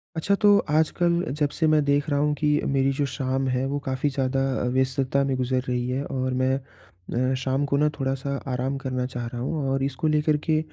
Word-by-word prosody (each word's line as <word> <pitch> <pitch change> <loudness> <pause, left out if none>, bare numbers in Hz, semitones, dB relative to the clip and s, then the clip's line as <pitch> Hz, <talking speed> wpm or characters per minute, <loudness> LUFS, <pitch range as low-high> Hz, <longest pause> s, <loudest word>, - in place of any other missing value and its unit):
अच्छा 195 +5 +1
तो, 205 0 +5
आजकल 170 +3 +2 0.2
जब 145 -1 +2
से 160 +2 0
मैं 155 -1 +4
देख 145 +1 +1
रहा 145 -1 +1
हूँ 150 0 +2
कि 150 - +2 0.2
मेरी 135 0 +2
जो 140 +1 0
शाम 135 0 -1
है 125 +1 0
वो 145 +1 -2
काफ़ी 130 +2 0
ज़्यादा 135 -1 -1 0.3
व्यस्तता 130 +1 +1
में 135 -1 0
गुज़र 130 0 0
रही 125 0 -1
है 130 +2 -1
और 130 -2 -2
मैं 130 +1 +2 0.8
अ, - - +2
शाम 135 +1 -1
को 140 0 0
ना 150 +1 +3
थोड़ा-सा 135 +1 -2
आराम 130 +1 -1
करना 125 -1 -1
चाह 125 -1 -5
रहा 120 0 -6
हूँ 135 +1 -2
और 135 0 0
इसको 140 +3 -1
लेकर 150 0 +2
के 155 -2 +2
135 Hz, 215 wpm, -25 LUFS, 130-150 Hz, 0.8 s, तो